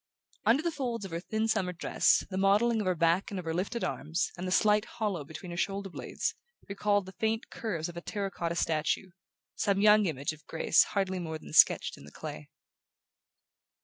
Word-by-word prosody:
Under 265 +7 +4
the 340 - 0
folds 240 -8 -3
of 190 - -8
her 165 - -2
thin 220 +4 -1
summer 195 -5 0
dress 175 - +2
the - - -3
modelling 215 +4 +3
of 200 - -3
her 185 - +2
back 170 +3 +2
and 200 - -5
of 180 - -7
her 160 - -2
lifted 200 +7 -2
arms, 160 +3 -2
and 185 +1 -5
the - - -3
slight 210 +2 +4
hollow 205 -8 -3
between 160 +5 -9
her 170 - -6
shoulder 195 +1 -2
blades, - - -3 0.3
recalled 205 0 +1
the 190 - -9
faint 220 +3 -2
curves 180 -8 -3
of 175 - -9
a 170 - -5
terra 200 +1 -3
cotta 170 -2 -3
statuette, 165 +3 0 0.4
some 200 -1 +1
young 210 0 +6
image 145 -1 -2
of 155 - -17
grace 160 - +3
hardly 190 -1 0
more 160 -2 -4
than - - -12
sketched - - +5
in - - -13
the 75 - -13
clay. 75 +1 -8
190 Hz, 205 wpm, -30 LUFS, 170-210 Hz, 0.4 s, young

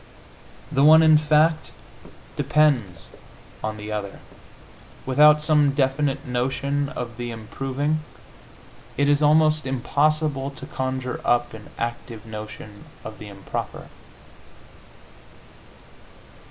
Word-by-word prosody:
The 135 - +2
one, 160 +2 +8
in 155 -1 +6
fact, 155 +1 +2 0.7
depends 125 - +1 0.5
upon 110 0 -4
the 105 0 -7
other: 105 -2 -5 0.9
without 150 +3 +5
some 150 -2 +3
definite 135 +1 0
notion 135 +3 -1
of 120 -2 -7
the 120 0 -5
improving 135 +7 -3 1.0
it 140 - +2
is 145 0 +3
almost 155 0 +3
impossible 140 +2 0
to 140 - -11
conjure 130 -1 -4
up 120 - +1
an 110 -1 -11
active 115 -1 -5
notion 105 -1 -9 0.2
of 110 -1 -9
the 105 - -9
improper. 100 -1 -7
135 Hz, 100 wpm, -23 LUFS, 115-150 Hz, 1.0 s, one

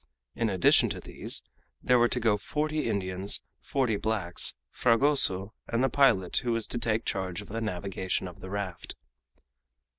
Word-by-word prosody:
In 115 -1 0
addition 95 -3 +4
to - - -4
these, - - -2 0.4
there 125 -1 +4
were 120 - +5
to 125 - -1
go 110 -3 +3
forty 155 +5 -2
Indians, 95 -1 -2 0.2
forty 125 -6 0
blacks, 100 -5 -2 0.2
Fragoso, 115 -6 +3
and 115 +2 0
the 135 - +3
pilot 115 -9 +3
who 120 -2 0
was 115 -1 0
to 120 - -3
take 115 -1 -1
charge 95 -2 -2
of 105 - -10
the 115 +2 -4
navigation 95 -2 -3
of 90 - -11
the 95 - -9
raft. 100 -3 -5
110 Hz, 160 wpm, -28 LUFS, 95-120 Hz, 0.4 s, were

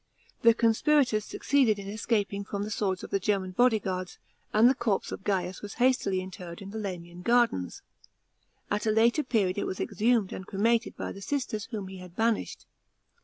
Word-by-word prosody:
The 230 -1 +6
conspirators 230 0 +3
succeeded 260 -7 +2
in 200 -1 -7
escaping 205 -1 -1
from 200 0 -4
the 210 - -5
swords 190 -3 -1
of - - -8
the 195 - +1
German 195 -1 0
bodyguards, 190 -5 +1 0.3
and 220 +3 +6
the 260 - +5
corp 220 -6 0
e - - -6
of - - -7
Gains 185 -2 -1
was 205 -1 -7
hastily 240 -7 +2
interred 180 -2 -8
in 195 0 -9
the 220 - -5
Lamian 175 -3 -6
gardens. 235 - +1 0.9
At 210 +2 0
a - - +4
later 230 +6 +4
period 205 -7 +1
it - - -2
was 190 - -4
exhumed 225 -3 +1
and 190 - -7
cremated 230 +4 +1
by - - -4
the 195 - -9
sisters 225 -3 -2
whom 215 -6 -5
he 190 0 -9
had 180 -1 -12
banished. 225 0 -1
205 Hz, 185 wpm, -28 LUFS, 190-230 Hz, 0.9 s, The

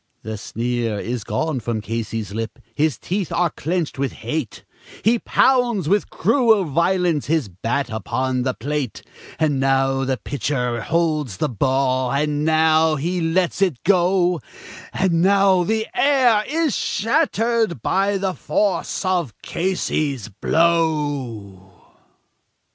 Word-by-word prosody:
The 110 0 -5
sneer 115 0 -2
is 120 +1 -4
gone 155 +2 -2
from 115 -1 -3
Casey's 110 -2 -4
lip, 115 +1 -4 0.2
his 150 +1 +1
teeth 190 -1 -3
are 175 -2 +1
clenched 165 -3 -3
with 140 -2 -1
hate; 120 +1 -5 0.4
He 230 +2 +3
pounds 240 - +2
with 200 +4 +1
cruel 225 - +3
violence 170 0 +1
his 155 -7 0
bat 115 +8 -2
upon 125 +4 -1
the 130 0 -1
plate; 140 -1 -3 0.3
And 150 -4 +1
now 135 0 +2
the 130 -1 -1
pitcher 125 -3 -2
holds 155 - 0
the 150 - 0
ball, 130 +1 +1
and 145 +1 0
now 160 0 +3
he 175 +5 -2
lets 175 +3 0
it 175 -11 +1
go, 180 -2 +2 0.5
And 175 -3 +1
now 195 -1 +4
the 220 +4 0
air 250 -7 +3
is 310 -2 0
shattered 230 - 0
by 195 +1 +1
the 190 -1 -1
force 200 +1 -1
of 175 - -1
Casey's 155 - -2
blow. 140 - -1
155 Hz, 125 wpm, -21 LUFS, 125-185 Hz, 0.5 s, now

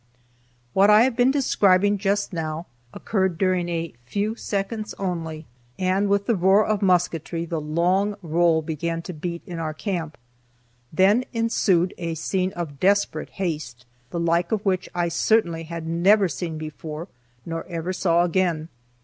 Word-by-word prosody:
What 195 +2 +5
I 210 +2 +7
have 255 -1 +1
been 245 +1 +4
describing 205 -7 +3
just 200 0 0
now 160 0 -3 0.3
occurred 190 -5 -1
during 185 -2 +1
a 165 -1 -3
few 205 - -2
seconds 215 0 -3
only, 165 -4 -4 0.3
and 190 +2 +1
with 200 0 +2
the 235 - +2
roar 190 +3 +4
of 215 -2 0
musketry 170 -3 +1
the 165 -2 -3
long 180 +7 +1
roll 165 0 +2
began 165 +2 -3
to 180 - -6
beat 170 +2 -5
in 175 -2 -6
our 155 -1 -3
camp. 165 -4 -4 0.7
Then 195 +9 +4
ensued 210 -6 +2
a 165 -2 -3
scene 185 +3 -1
of 155 -5 -6
desperate 200 +2 +1
haste, 150 -10 -4 0.2
the 170 - -3
like 170 +1 +1
of 215 -2 -1
which 185 -2 0
I 175 -1 +1
certainly 170 -2 +1
had 165 0 -6
never 190 +5 +4
seen 160 +1 -4
before, 155 +1 -7 0.4
nor 165 -1 -4
ever 170 +1 -3
saw 175 -2 +2
again. 170 -3 0
175 Hz, 155 wpm, -24 LUFS, 165-200 Hz, 0.7 s, I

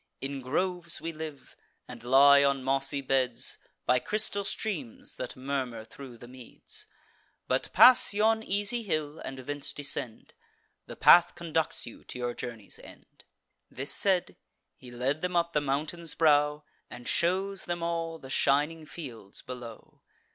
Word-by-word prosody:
In 135 0 -4
groves 170 +5 -1
we 165 - -4
live, 155 -3 -9 0.3
and 120 -2 -10
lie 140 +3 +7
on 140 -1 +1
mossy 135 +1 0
beds, 130 -3 0 0.3
By 125 0 +3
crystal 210 - 0
streams, 175 - -5
that 125 - -5
murmur 130 -4 -3
thro' 130 0 -11
the 120 - -12
meads: 125 -1 -8 0.6
But - - 0
pass 255 -1 +8
yon 220 +2 +2
easy 205 +3 0
hill, 155 -6 -3
and 135 - -7
thence 145 +2 -3
descend; 140 -6 -5 0.5
The - - -8
path 175 0 +6
conducts 165 -2 -2
you 120 - -11
to - - -7
your 120 -1 -2
journey's 115 -5 -7
end." - - -15 0.4
This 140 +2 0
said, 190 -3 0 0.4
he 125 - -13
led 130 +5 -2
them 180 0 -2
up 170 0 +1
the 150 - +2
mountain's 150 +4 -2
brow, 150 -1 +3 0.3
And 120 0 -10
shews 190 +3 0
them 175 -1 -3
all 165 -1 -2
the 135 -4 -11
shining 150 +4 +1
fields 120 - -9
below. 120 -3 -10
145 Hz, 145 wpm, -29 LUFS, 130-170 Hz, 0.6 s, pass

